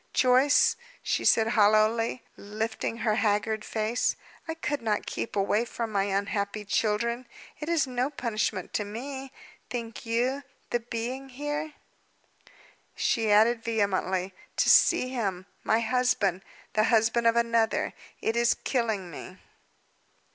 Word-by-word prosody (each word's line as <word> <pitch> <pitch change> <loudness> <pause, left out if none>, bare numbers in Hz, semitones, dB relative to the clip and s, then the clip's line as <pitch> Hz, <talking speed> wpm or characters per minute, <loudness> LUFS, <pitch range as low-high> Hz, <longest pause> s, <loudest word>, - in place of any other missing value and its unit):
"Joyce," 260 +3 +4 0.3
she - - 0
said, 225 0 +4
hollowly, 220 +2 +3
lifting 220 +2 -4
her 220 -2 0
haggard 215 0 +1
face, 220 +3 0 0.3
"I 325 - -3
could 295 -3 -3
not 215 -2 -1
keep - - -4
away 205 +3 +2
from 230 -1 -4
my 200 -1 +1
unhappy 200 +1 -2
children. 235 +4 0 0.3
Is 315 -1 +1
it - - -11
no 250 +2 0
punishment 215 -8 -2
to 210 - 0
me, 265 +6 -7 0.4
think 230 -2 -5
you, 245 +4 0 0.3
the 240 - +1
being 245 +3 -5
here?" 295 +3 -4 1.2
she 225 -2 +1
added, 225 +3 +4
vehemently. 190 -4 0 0.2
"To - - +5
see 255 - +5
him 195 -8 -3 0.2
my 220 +1 +2
husband 225 -6 +1 0.3
the 215 0 +3
husband 225 +1 +3
of 230 - +4
another! 230 -1 +1 0.3
It 225 - 0
is 235 0 +3
killing 220 -8 -2
me." 185 +4 -9
230 Hz, 130 wpm, -27 LUFS, 210-245 Hz, 1.2 s, To